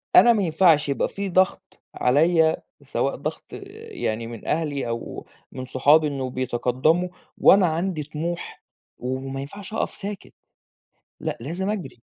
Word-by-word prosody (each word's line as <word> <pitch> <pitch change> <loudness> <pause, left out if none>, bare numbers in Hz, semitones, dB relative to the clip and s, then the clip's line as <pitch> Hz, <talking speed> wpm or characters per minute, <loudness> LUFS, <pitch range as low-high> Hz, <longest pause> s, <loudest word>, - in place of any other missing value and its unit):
أنا 240 - +8
ما 210 -3 +1
ينفعش 160 -3 +4
يبقى 140 - +1
في 200 0 -4
ضغط، 185 +1 +1 0.2
عليّا 160 +5 +3 0.3
سواء - - -1
ضغط - - -5 0.5
يعني 115 - -2
من 115 -2 -9
أهلي 150 -5 -1
أو 115 0 -5 0.3
من 130 0 -6
صحابي 145 +5 +4
إنه 135 -3 -3
بيتقدموا، 130 +7 +1 0.3
وأنا 195 -2 +6
عندي 165 -1 -1
طموح، 160 +4 -5 0.3
و 130 +1 -3
وما 135 +1 -5
ينفعش 195 +9 -9
أقف - - -2
ساكت، 200 -1 -7 0.9
لأ - - -3
لازم 175 +9 -3
أجري. 155 - -5
155 Hz, 140 wpm, -24 LUFS, 130-185 Hz, 0.9 s, أنا